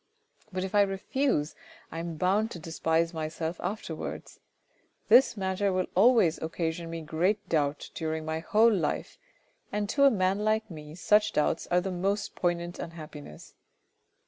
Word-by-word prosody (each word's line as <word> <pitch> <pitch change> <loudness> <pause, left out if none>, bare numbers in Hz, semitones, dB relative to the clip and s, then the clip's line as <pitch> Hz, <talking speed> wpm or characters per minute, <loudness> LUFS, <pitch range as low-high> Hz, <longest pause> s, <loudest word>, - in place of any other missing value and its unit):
" 215 - -34
But 185 0 -2
if 190 - -5
I 205 - +5
refuse, 195 - 0 0.4
I 165 - -5
am 165 -1 -5
bound 200 +6 +2
to 185 - -7
despise 165 +1 0
myself 160 +1 -4
afterwards. 200 +5 -5 0.7
This 255 -3 +6
matter 190 +1 0
will 185 -1 0
always 205 -5 +4
occasion 165 +1 -3
me 165 0 -5
great 180 +7 0
doubt 150 -2 -1
during 160 -1 -3
my 160 0 -2
whole 220 +7 +4
life, 170 -7 -2 0.5
and 210 0 -1
to 280 +3 +4
a - - +8
man 190 -4 +1
like 215 0 0
me 150 -1 -9
such 210 +4 +3
doubts 150 - 0
are 180 0 +2
the 190 +1 -3
most 195 +3 -1
poignant 175 0 -2
unhappiness. 150 - -9
180 Hz, 155 wpm, -28 LUFS, 160-205 Hz, 0.7 s, a